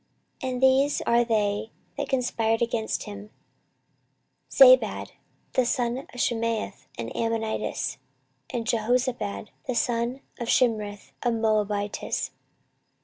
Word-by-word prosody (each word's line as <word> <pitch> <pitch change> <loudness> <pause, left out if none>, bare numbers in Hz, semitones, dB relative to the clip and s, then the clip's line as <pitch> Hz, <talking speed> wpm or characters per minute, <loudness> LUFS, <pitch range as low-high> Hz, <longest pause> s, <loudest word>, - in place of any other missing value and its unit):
14:024:026 260 - -2
And 250 +1 -3
these 270 +2 +4
are 235 +1 +3
they 215 -1 0 0.2
that - - -3
conspired 230 -3 +1
against 230 -2 -1
him; 205 0 -9 1.2
Zabad - - +6 0.4
the 255 - +3
son 240 0 0
of 245 - -9
Shimeath 230 -2 -1
an 115 0 -4
Ammonitess, 225 -1 -2 0.5
and 235 -2 -3
Jehozabad 235 -2 0 0.2
the 255 - -1
son 240 0 0 0.2
of 235 - -3
Shimrith 215 -5 +1
a 240 - +1
Moabitess. 210 -2 0
230 Hz, 110 wpm, -26 LUFS, 215-245 Hz, 1.2 s, Zabad